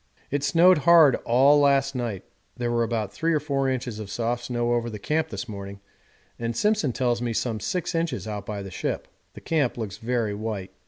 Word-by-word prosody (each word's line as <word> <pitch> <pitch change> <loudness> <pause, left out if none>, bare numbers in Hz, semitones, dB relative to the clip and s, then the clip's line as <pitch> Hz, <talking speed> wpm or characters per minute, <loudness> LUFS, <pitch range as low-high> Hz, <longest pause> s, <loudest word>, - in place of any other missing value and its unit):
It 140 0 -1
snowed 175 +2 +5
hard 160 -2 +7
all 135 +5 +5
last 140 -1 +3
night; 115 -7 -3 0.3
there 120 -1 -1
were 120 0 +1
about 110 -3 -2
three 165 0 0
or - - +2
four 140 -3 -1
inches 125 -4 -3
of 105 -2 -7
soft 120 +3 -2
snow 120 -1 0
over 120 0 0
the 110 - -6
camp 155 +10 -1
this 125 - -5
morning 100 -2 -7 0.6
and 115 0 -3
Simpson 210 - +2
tells 120 -1 0
me 120 -1 -1
some 110 -1 -1
six 175 - -2
inches 165 -9 -2
out 105 -2 -5
by 105 -2 -4
the 95 - -8
ship. - - -3 0.3
The - - -10
camp 150 -8 0
looks 110 -4 -5
very 115 -3 -1
white. 105 -2 -5
120 Hz, 205 wpm, -25 LUFS, 110-140 Hz, 0.6 s, hard